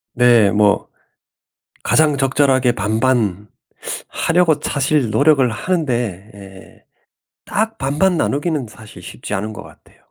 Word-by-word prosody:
네, 120 -4 +4
뭐 105 -1 +2 1.0
가장 150 -2 +2
적절하게 135 -2 +2
반반 110 -2 -1 0.6
하려고 165 -1 +2
사실 140 -3 0
노력을 140 +3 +3
하는데 120 - -3
예 95 -1 -15 0.6
딱 220 +1 -2
반반 150 +8 0
나누기는 150 -3 -1
사실 110 -1 -14
쉽지 - - -8
않은 105 +2 -3
것 105 - -9
같아요. - - -19
125 Hz, 230 characters per minute, -18 LUFS, 105-150 Hz, 1.0 s, 네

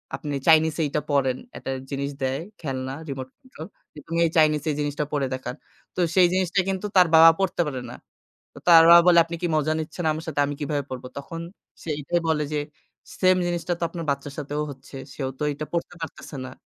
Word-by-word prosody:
আপনি 145 -2 -5
চাইনিজটা 155 -2 +3
পড়েন। 130 -3 +2 0.2
একটা 135 - -5 0.2
জিনিস 140 +1 -3
দেয় 130 +2 -1 0.2
খেলনা 130 -3 -4 0.2
রিমোট 130 -1 -5
কন্ট্রোল। 260 -5 -11 0.4
তুমি 165 +1 -2
এই 160 - 0
চাইনিজ 155 -2 +4 0.2
জিনিসটা 145 0 -2
পড়ে 140 -2 0
দেখান। 130 0 -5 0.4
তো - - -5 0.2
সেই 180 -2 +6
জিনিসটা 185 0 +1
কিন্তু 190 +2 -2
তার 180 -2 +7
বাবা 165 +1 +10
পড়তে 185 -2 0
পারে 130 -3 -5
না। - - -8 0.6
তো - - -10
তার 165 -1 +9
বাবা 170 0 +10
বলে 170 -1 +7
আপনি 170 0 -6
কি 175 - 0
মজা 155 +1 +1
নিচ্ছেন 160 +2 -5
আমার 160 +1 -6
সাথে 155 - -3
আমি 145 - -3
কিভাবে 145 -1 -1
পড়ব? 130 -1 -6 0.2
তখন 165 +4 -7 0.4
সে 165 - -7
এটাই 170 +4 0
বলে 150 -1 +1
যে 150 - 0 0.6
সেইম 185 0 +5
জিনিসটা 175 0 -1
তো - - -3
আপনার 165 -2 -6
বাচ্চার 140 0 -4
সাথেও 145 +1 -3
হচ্ছে। 135 +1 -13 0.2
সেও 135 -2 -3
তো - - -2
এটা 150 +2 -6
পড়তে 170 +1 -3
পারতেছে 160 -2 -8
না। - - -8
155 Hz, 200 wpm, -24 LUFS, 140-170 Hz, 0.6 s, বাবা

